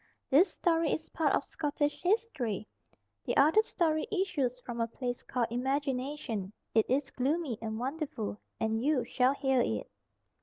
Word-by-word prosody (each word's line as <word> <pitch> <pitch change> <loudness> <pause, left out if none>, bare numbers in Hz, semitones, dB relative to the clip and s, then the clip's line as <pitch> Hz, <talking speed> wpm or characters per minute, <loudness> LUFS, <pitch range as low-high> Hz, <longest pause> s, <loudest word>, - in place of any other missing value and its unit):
This 340 +7 +6
story 330 -2 +2
is 315 - -2
part 310 -4 +2
of - - 0
Scottish 295 -1 -2
history. 315 - 0 0.6
The - - 0
other 315 +10 +6
story 320 -7 0
issues 335 - 0
from 235 -1 -3
a 230 - +1
place 245 +1 -4
called 245 -3 -1
Imagination; 265 -4 -2 0.2
it 220 -1 +4
is 270 +2 +1
gloomy 275 -2 -1
and 220 -1 -3
wonderful, 260 -6 -3 0.2
and 220 +1 0
you 275 -4 +2
shall 255 +3 +2
hear 265 -2 +2
it. 110 -2 -2
270 Hz, 150 wpm, -31 LUFS, 240-310 Hz, 0.6 s, This